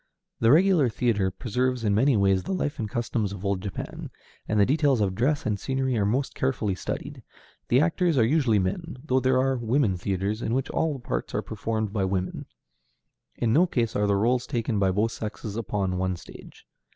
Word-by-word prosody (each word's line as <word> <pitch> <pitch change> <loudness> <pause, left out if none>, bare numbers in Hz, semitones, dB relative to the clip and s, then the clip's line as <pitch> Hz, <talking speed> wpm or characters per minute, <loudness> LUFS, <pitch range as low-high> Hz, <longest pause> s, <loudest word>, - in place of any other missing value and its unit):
The 115 - +3
regular 170 -4 +5
theatre 105 -3 +1
preserves 125 +4 -2
in 105 -2 +2
many 125 +4 +3
ways 95 -1 +3
the 190 - -4
life 150 -5 -2
and 110 -2 -2
costumes 115 -4 -2
of 100 0 -7
old 100 -2 0
Japan, 100 -1 -6 0.4
and 105 - +1
the 100 - +6
details 140 -1 +2
of 100 -3 +1
dress 135 +9 0
and 105 -2 -1
scenery 130 +1 -1
are 100 -3 +1
most 130 +6 0
carefully 125 -6 -1
studied. - - -5 0.5
The 125 +3 +4
actors 170 -1 +1
are 115 - +5
usually 130 -4 +3
men, 115 - -2
though 130 -3 +2
there 130 0 +2
are 135 0 +1
"women 115 -4 +1
theatres" 100 +4 -2
in 115 - -1
which 135 0 -1
all 160 -1 0
the 135 - -7
parts - - -3
are - - -1
performed 110 -2 -3
by 100 -3 0
women. 95 -1 -3 0.9
In 115 -2 0
no 175 +5 +5
case 115 -8 -1
are 105 0 +1
the 100 - +2
rôles 120 +5 +1
taken 115 -2 -1
by 95 -1 +3
both 105 +4 +1
sexes 110 -2 -6
upon 100 -4 -2
one 95 0 0
stage. - - -13
115 Hz, 200 wpm, -26 LUFS, 100-130 Hz, 0.9 s, the